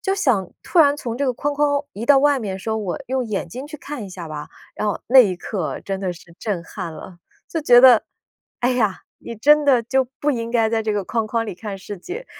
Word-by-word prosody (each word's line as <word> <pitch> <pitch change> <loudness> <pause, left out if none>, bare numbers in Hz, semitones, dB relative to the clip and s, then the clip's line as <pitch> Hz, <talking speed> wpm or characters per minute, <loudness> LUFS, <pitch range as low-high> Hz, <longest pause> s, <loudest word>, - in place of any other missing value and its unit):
就 385 -2 0
想 240 - +1
突 360 - -1
然 290 -3 +6
从 235 -5 -5
这 280 - -1
个 255 - +1
框 290 +4 -2
框 285 0 +1
移 220 +4 -6
到 285 -2 +7
外 285 0 +3
面， 195 -5 -4
说 220 +3 -3
我 195 -5 -3
用 260 -1 -1
眼 200 -5 -3
睛 255 - -7
去 305 +1 -9
看 285 -5 -7
一 - - -8
下 180 -2 -8
吧， 150 -1 -7 0.3
然 215 - -2
后 205 - -2
那 265 +3 +7
一 195 -7 +6
刻 180 -2 -4
真 195 -1 -4
的 185 -2 -2
是 170 0 -16
震 200 -6 -3
撼 165 - -6
了。 175 +2 -11 0.3
就 325 - -2
觉 245 -5 +7
得： 250 -4 +8 0.6
“哎 245 +1 +2
呀， 215 -6 0 0.2
你 235 - -8
真 295 +6 +5
的 265 -4 +4
就 265 +3 +1 0.2
不 295 - +2
应 230 -2 -3
该 230 -2 +2
在 225 0 0
这 215 -1 -1
个 205 -2 -2
框 225 +3 -1
框 225 +1 -1
里 210 - -5
看 195 +2 -7
世 200 +2 -8
界， 390 - -8
230 Hz, 265 characters per minute, -21 LUFS, 195-275 Hz, 0.6 s, 得